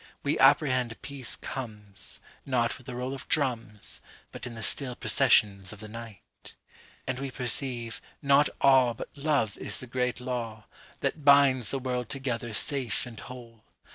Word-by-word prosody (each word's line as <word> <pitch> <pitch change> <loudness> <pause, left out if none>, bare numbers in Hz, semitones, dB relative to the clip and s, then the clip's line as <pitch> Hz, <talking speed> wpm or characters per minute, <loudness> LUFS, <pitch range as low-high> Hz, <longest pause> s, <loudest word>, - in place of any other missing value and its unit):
We 145 - 0
apprehend 130 -4 +4
peace 135 -4 -3
comesNot 115 +1 -3
with 125 - -17
the 125 - -5
roll 125 +2 -3
of 135 - -7
drums, 115 -8 +1 0.3
But - - -7
in 120 - -8
the 115 - -6
still 125 0 +1
processions 105 -9 +3
of 105 - -11
the 110 - -8
night. 115 -1 -11 0.5
And 130 -1 -2
we 135 0 -3
perceive, 125 -2 -2 0.2
not 140 0 +4
aweBut 130 -4 +4
love 140 -9 +1
is - - -2
the - - -5
great 125 -1 -1
lawThat 120 +4 -5
binds 140 -4 +5
the 135 - +1
world 125 -2 -3
together 125 -4 -3
safe 130 +1 +1
and 115 -3 -10
whole. 115 -3 -11
125 Hz, 145 wpm, -28 LUFS, 115-135 Hz, 0.5 s, binds